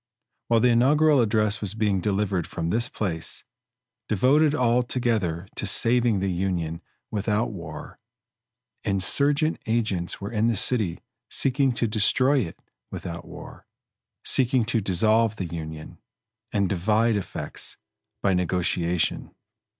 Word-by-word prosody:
While 115 -1 +3
the 125 - +4
inaugural 140 +4 +4
address 105 -2 +1
was 105 0 -2
being 105 -4 0
delivered 100 -3 -1
from 85 -1 -3
this 115 +3 +2
place, 85 -6 -3 0.7
devoted 145 +8 +3
altogether 120 - 0
to 105 - -1
saving 115 0 +3
the 95 -1 0
Union 85 -3 -2 0.3
without 105 +2 -1
war, 80 -6 -9 0.8
insurgent 140 - +2
agents 110 -6 -1
were 100 +3 -6
in 110 0 +1
the 115 - +1
city 100 -5 +1 0.3
seeking 135 0 +2
to 120 0 0
destroy 130 +6 +3
it 85 -10 -4 0.3
without 85 -1 -7
war - - -12 0.6
seeking 125 -2 +2
to 115 -1 0
dissolve 110 +4 +2
the 95 - -4
Union, 80 -1 -7 0.5
and 100 -2 +1
divide 105 +5 +1
effects, 100 - -4 0.5
by 100 - +3
negotiation. 90 -1 -1
105 Hz, 120 wpm, -25 LUFS, 90-120 Hz, 0.8 s, the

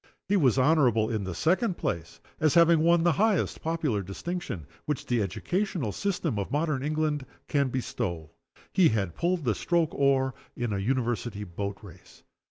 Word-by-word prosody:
He 205 - +2
was 135 - +3
honorable, 125 -6 +3
in 110 -3 -2
the 95 -2 -4
second 185 - +1
place, 85 -1 -3 0.2
as 155 0 +2
having 170 -1 +6
won 170 +1 +4
the 175 - +4
highest 205 +3 +1
popular 160 -10 -1
distinction 100 - -5 0.2
which 150 -3 -2
the 120 -2 +1
educational 170 - -2
system 175 - -1
of 100 - -3
modern 150 -2 0
England 155 -1 0 0.2
can 140 -3 +1
bestow 85 - -3 0.4
he 180 -4 +5
had 100 -6 -1
pulled 175 - 0
the 115 - +2
stroke 170 - 0
oar 135 -1 +2 0.2
in 120 -3 -2
a 100 - -1
University 120 -1 -1
boat 100 +2 -5
race. 95 -6 -15
135 Hz, 165 wpm, -28 LUFS, 105-165 Hz, 0.4 s, having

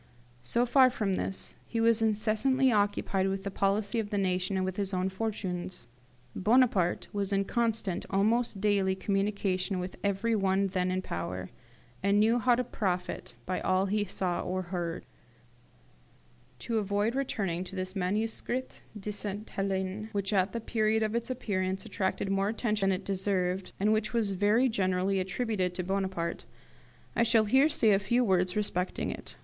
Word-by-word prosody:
So 235 - +1
far 255 +1 +6
from 210 -6 -1
this, 190 +1 -2
he 230 - -2
was 225 0 +4
incessantly 225 +5 +2
occupied 205 -2 +1
with 195 0 -2
the 200 - -3
policy 200 +3 0
of 210 -2 -2
the 205 - -1
nation, 185 0 0
and 185 - 0
with 185 -1 -3
his 195 -2 -1
own 185 +1 0
fortunes. 185 - -4 0.5
Bonaparte 210 -5 +3
was 200 -1 -2
in 195 0 +1
constant, 225 -5 -1
almost 215 +2 +1
daily, 195 -2 +2
communication 195 -1 -1
with 180 0 -5
every 200 +3 +1
one 195 -1 +2
then 185 -1 0
in 185 0 -1
power, 90 - -4 0.5
and 200 +2 +3
knew 225 +3 +4
how 245 +1 +4
to 250 - 0
profit 185 -6 -3
by 185 0 -1
all 185 +1 +2
he 205 +1 +1
saw 185 -3 -2
or 185 +1 -2
heard. 170 -2 -3 1.6
To 230 -2 0
avoid 205 +2 0
returning 200 -10 -1
to 185 - -8
this 185 +1 -4
'Manuscrit 220 +6 -2 0.2
de 210 +1 -4
Sainte 205 +1 -4
Helene', 195 +2 -2
which 200 0 -1
at 190 0 +2
the 230 - -3
period 220 -1 +1
of 215 0 -1
its 235 +1 -2
appearance 190 -6 -2
attracted 195 -1 -1
more 195 +1 +1
attention 215 -3 0
than 185 -1 0
it - - -19
deserved, 190 -1 -1
and 210 +2 +3
which 215 +1 -1
was 225 -4 +1
very 210 +7 +3
generally 190 -3 +1
attributed 190 -1 -1
to 180 - -2
Bonaparte, 190 -3 -2 0.7
I - - +2
shall 230 -1 +4
here 265 +8 +5
say 225 -7 +3
a 195 - +4
few 235 +5 +2
words 185 -4 +2
respecting 190 -3 -1
it. - - -9
200 Hz, 165 wpm, -30 LUFS, 185-220 Hz, 1.6 s, far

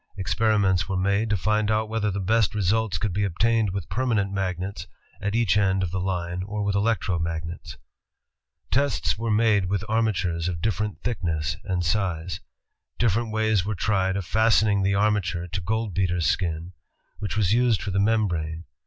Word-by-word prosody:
Experiments 100 -1 +1
were 95 - -1
made 100 +4 +1
to 105 - +2
find 105 +3 +1
out 110 0 +1
whether 110 -1 -1
the 100 0 -2
best 110 +3 +2
results 105 +2 +1
could 105 -5 -2
be 100 +3 0
obtained 110 +3 +1
with 95 -3 -4
permanent 105 -2 0
magnets 95 0 -3 0.3
at 105 +1 -1
each 115 -4 +3
end 95 -2 +2
of 85 - -2
the 95 - -2
line 90 -1 -2
or 105 +2 -3
with 100 -1 0
electro 100 -4 +1
magnets. 80 0 -5 0.9
Tests 140 +2 +1
were 115 0 -2
made 105 -2 +3
with 95 +2 -1
armatures 95 -7 0
of 85 -2 -3
different 105 +1 -2
thickness 80 - -1
and 90 -2 -1
size. 90 -2 -1 0.6
Different 115 0 +1
ways 110 -3 +2
were 105 +2 -2
tried 95 0 +1
of 100 - -3
fasten 110 +1 +3
ing 100 -1 +2
the 100 +1 +2
armature 100 -4 0
to 90 +3 -3
goldbeater's 95 -4 -1
skin, 85 0 -1 0.5
which 105 0 -3
was 100 -2 +2
used 120 -3 +3
for 100 - -3
the 100 - 0
membrane. 90 -7 0
100 Hz, 170 wpm, -25 LUFS, 90-110 Hz, 0.9 s, each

